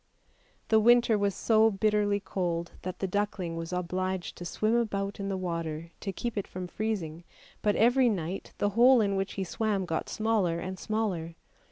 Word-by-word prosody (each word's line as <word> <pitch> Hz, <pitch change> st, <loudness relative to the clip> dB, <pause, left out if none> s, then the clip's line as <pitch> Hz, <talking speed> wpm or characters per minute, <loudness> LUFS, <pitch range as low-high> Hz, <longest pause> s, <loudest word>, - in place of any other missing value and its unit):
The 220 Hz, -, +5 dB
winter 240 Hz, 0 st, +5 dB
was 200 Hz, -2 st, 0 dB
so 220 Hz, -1 st, +4 dB
bitterly 205 Hz, 0 st, +1 dB
cold 175 Hz, -3 st, -2 dB
that 185 Hz, 0 st, -5 dB
the 195 Hz, -, -2 dB
duckling 190 Hz, -3 st, -2 dB
was 165 Hz, +1 st, -5 dB
obliged 180 Hz, +1 st, -2 dB
to 175 Hz, -, -7 dB
swim 215 Hz, +5 st, 0 dB
about 200 Hz, -4 st, -1 dB
in 200 Hz, 0 st, -3 dB
the 195 Hz, -, -1 dB
water 165 Hz, -2 st, -4 dB
to 195 Hz, -, -3 dB
keep 220 Hz, +2 st, -3 dB
it 200 Hz, -, -5 dB
from 185 Hz, 0 st, -6 dB
freezing, 175 Hz, -5 st, -3 dB, 0.4 s
but 210 Hz, -1 st, +2 dB
every 245 Hz, +2 st, +4 dB
night 185 Hz, -2 st, -3 dB
the 205 Hz, -, +1 dB
hole 240 Hz, +4 st, +6 dB
in 200 Hz, -2 st, +1 dB
which 195 Hz, 0 st, -2 dB
he 195 Hz, -, -2 dB
swam 205 Hz, 0 st, -1 dB
got 165 Hz, -2 st, -3 dB
smaller 210 Hz, -6 st, +1 dB
and 185 Hz, +1 st, -5 dB
smaller. 190 Hz, -7 st, -2 dB
195 Hz, 180 wpm, -29 LUFS, 180-215 Hz, 0.4 s, hole